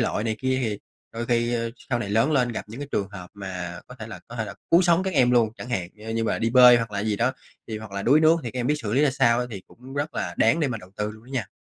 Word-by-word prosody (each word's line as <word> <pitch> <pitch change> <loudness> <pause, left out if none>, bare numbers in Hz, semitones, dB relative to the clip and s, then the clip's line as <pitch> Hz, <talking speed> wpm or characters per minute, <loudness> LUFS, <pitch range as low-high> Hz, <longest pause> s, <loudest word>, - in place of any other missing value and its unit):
lội 115 -2 0
này 110 -1 -1
kia 130 +2 0
thì 105 -3 -2 0.3
đôi 115 +1 -4
khi 120 0 +1 0.3
sau 120 - +2
này 105 - -4
lớn 115 +8 +3
lên 125 -4 +3
gặp - - -4
những 115 +6 -8
cái 145 - -6
trường 100 -1 0
hợp 90 -3 -10
mà 90 -3 -6
có 125 - -11
thể 110 - -7
là 100 -6 -9
có 120 - -9
thể 110 - -1
là - - -8 0.2
cứu 170 +2 +6
sống 175 0 +3
các 190 -1 -2
em 125 -3 +4
luôn, 120 -3 +4
chẳng 120 - -8
hạn 90 -8 -2 0.2
như 115 0 0
mà - - 0
đi 115 - 0
bơi 125 0 +8
hoặc 115 -2 -2
là 100 -1 -2
gì 105 0 -1
đó 125 +4 +1 0.4
thì 110 -1 -4
hoặc 110 -1 -9
là 100 - -3
đuối 145 +8 +5
nước 160 +1 +6
thì 120 - -4
các 125 - -6
em 120 - -1
biết 150 - +2
xử 105 -1 -3
lý 135 - +3
ra 145 - +4
sao 125 -2 +2
thì 100 -6 -7
cũng 130 +3 -13
rất 145 +2 -2
là - - -3
đáng 165 - +3
để 145 - +2
mà 115 -3 -3
đầu 90 -1 -14
tư 105 0 -2
luôn 110 +1 -14
đó - - -17
nha. 120 -8 -1
115 Hz, 320 wpm, -25 LUFS, 105-130 Hz, 0.4 s, bơi